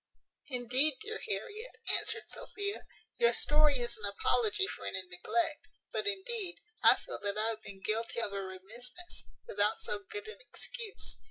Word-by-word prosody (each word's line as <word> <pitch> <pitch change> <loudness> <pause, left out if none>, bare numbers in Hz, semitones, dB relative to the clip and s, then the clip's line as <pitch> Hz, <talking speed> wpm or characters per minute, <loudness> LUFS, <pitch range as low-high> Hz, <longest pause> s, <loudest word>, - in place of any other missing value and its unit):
"Indeed, 255 +3 +4
dear 440 +1 -3
Harriet," 445 +2 -3 0.2
answered - - +1
Sophia, 405 0 -1 0.4
"your 475 0 +5
story 300 -1 +4
is 240 -1 0
an 210 - -4
apology 400 - +3
for - - -7
any 190 - -1
neglect; 290 - -1 0.2
but, 430 - -1
indeed, 405 -1 +1 0.2
I - - +9
feel - - -7
that 205 0 0
I 220 +1 +2
have 220 -1 -4
been 195 -2 -8
guilty 225 +3 0
of 210 -3 -1
a 200 - -2
remissness, 230 - -6 0.2
without 470 - +1
so - - 0
good 420 +1 -4
an 440 - -9
excuse. 465 -3 -4
295 Hz, 160 wpm, -32 LUFS, -, 0.4 s, I